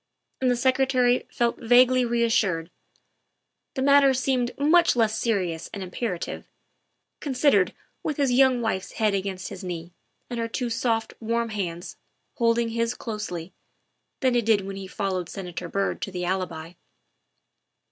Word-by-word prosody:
And 255 - +3
the 245 - +3
Secretary 255 0 +2
felt 235 -1 0
vaguely 250 +2 +5
reassured; 225 -8 +1 1.0
the 265 - -1
matter 280 -1 +6
seemed 255 -1 +1
much 320 +4 +4
less 220 -2 +2
serious 185 -9 -1
and 200 - -5
imperative, 180 0 -4 0.7
considered 260 -9 +2 0.3
with 305 - -3
his 280 -3 +2
young 255 -1 +4
wife's 205 -5 -2
head 215 -2 +1
against 190 -1 -3
his 190 -2 -8
knee 175 -1 -6 0.3
and 240 -1 -5
her 230 - -1
two 240 +1 -3
soft, 225 -1 0
warm 230 +1 -1
hands 175 -5 -5 0.4
holding 230 -1 +2
his 230 +1 -1
closely, 210 -6 -5 0.7
than 260 -2 +3
it 235 -2 +1
had 220 - +6
done 195 - -7
when 195 - -5
he 195 -1 -7
followed 185 -3 -3
Senator 180 -3 -6
Byrd 195 +2 -1
to 195 - -4
the 180 -1 -3
Alibi. 175 -3 -3
230 Hz, 145 wpm, -25 LUFS, 190-250 Hz, 1.0 s, matter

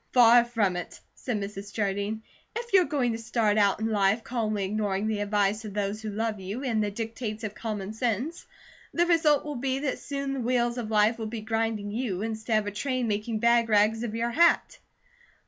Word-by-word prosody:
"Far 240 -1 +7
from 215 -7 0
it!" 180 - -7
said 240 -5 -3
Mrs. 200 0 -6
Jardine. 205 +1 -2 0.3
"If 475 0 -5
you're 375 -2 +6
going 265 -7 0
to 225 - -3
start 220 -2 +1
out 200 -1 +3
in 220 - -1
life, 215 0 +2
calmly 215 -5 -1
ignoring 205 0 -1
the 215 -1 -1
advice 205 +1 +1
of 210 -2 -7
those 205 +1 -2
who 220 - -4
love 215 0 -2
you, 200 +8 -5
and 225 -5 +1
the 205 - 0
dictates 225 +1 -5
of 210 -1 -3
common 210 -2 -4
sense, 245 - -2 0.5
the 345 - +4
result 320 -5 +3
will 295 -3 -4
be 260 +1 -1
that 275 -1 -2
soon 275 -1 -3
the 270 - -3
wheels 240 0 +1
of 220 -3 -4
life 215 +2 +3
will 220 - -3
be 220 0 -5
grinding 225 -2 -1
you, 215 -4 -2
instead 220 0 -1
of 215 - 0
a 205 - -3
train 255 +3 -1
making 215 +1 -1
bag 235 -1 +4
rags 215 +1 +3
of 230 -2 -3
your 235 +1 -1
hat." 335 +7 +3
220 Hz, 205 wpm, -27 LUFS, 210-240 Hz, 0.5 s, Far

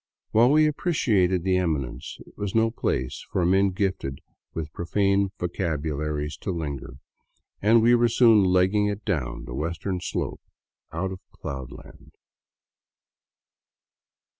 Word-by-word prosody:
While 115 +3 +5
we 155 +2 +5
appreciated 105 - +1
the 95 0 +2
eminence, 75 -8 -2
it - - -19
was 105 -1 -4
no 115 0 +3
place 65 - -2
for 90 - +1
men 95 +2 +4
gifted 95 -8 -2 0.3
with 80 -2 -5
profane 100 +2 +1
vocabularies 75 -3 -2
to - - -6
linger, 70 -7 -4 0.7
and 110 +2 +5
we 120 +1 +6
were 120 0 +4
soon 115 -3 +5
legging 95 +3 +3
it 105 +1 -4
down 75 - -2
the - - -7
western 85 +6 -3
slope - - -3 0.5
out 95 +4 -2
of 95 - -7
Cloudland. 65 -3 -9
95 Hz, 125 wpm, -25 LUFS, 80-105 Hz, 0.7 s, we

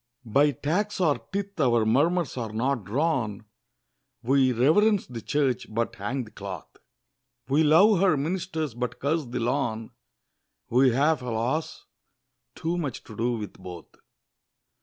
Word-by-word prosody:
By 140 +7 +3
Tax 175 - -2
or 150 -9 +2
Tithe 200 -1 -4
our 120 -5 +3
murmurs 150 +8 +2
are 115 -4 -4
not 120 0 -1
drawn; 115 - -1 0.8
We 130 +1 +3
reverence 185 - +3
the 120 -2 -8
Church 130 -5 -1
but 115 +2 -1
hang 120 +7 -3
the 110 - -14
cloth! 95 -4 -8 0.7
We 140 +4 +3
love 175 +6 +5
her 185 -6 +4
ministers 160 -2 -2
but 125 +1 -4
curse 155 +2 0
the 120 - -4
lawn! 115 -2 -1 0.8
We 130 +2 +5
have, 145 +5 +2
alas! 125 +6 -2 0.7
too 170 +2 -2
much 140 -7 -4
to 110 - -12
do 120 +3 0
with 105 -3 -5
both! 90 -3 -10
135 Hz, 140 wpm, -26 LUFS, 115-160 Hz, 0.8 s, love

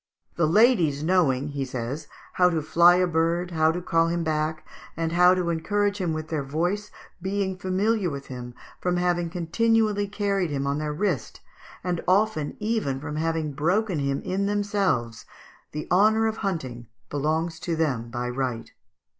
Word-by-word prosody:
"The 170 -2 +2
ladies 170 - +4
knowing," 155 -6 +2
he 140 -1 -3
says, 130 +4 -5 0.3
"how 180 0 +4
to 160 -3 -1
fly 170 +3 +6
a 180 0 +3
bird, 170 +1 0
how 160 -1 +3
to 175 +1 -4
call 165 -1 +2
him 170 0 -1
back, 155 0 -1 0.3
and 165 0 -1
how 180 +1 +5
to 175 -2 0
encourage 205 +5 0
him 175 -3 0
with 155 0 -4
their 155 -3 -1
voice, 175 +9 -2 0.3
being 190 0 -1
familiar 190 +2 0
with 140 -2 -6
him 125 -1 -8 0.2
from 180 0 0
having 175 -1 +1
continually 205 +4 +1
carried 200 -3 -1
him 140 -1 -2
on 140 +1 0
their 150 -1 -2
wrist, 155 - -2 0.4
and 175 -2 -1
often 190 -6 +1
even 210 -12 -1
from 150 +1 -5
having 160 -2 -1
broken 180 +5 +1
him 140 0 -1
in 195 +2 -1
themselves, 200 - 0 0.5
the 150 0 -5
honour 215 +4 +4
of 220 0 -1
hunting 130 - -4 0.2
belongs 160 +3 -1
to 170 -1 -2
them 130 -8 -1
by 120 +1 -3
right. 125 -2 -3
165 Hz, 165 wpm, -25 LUFS, 150-190 Hz, 0.5 s, fly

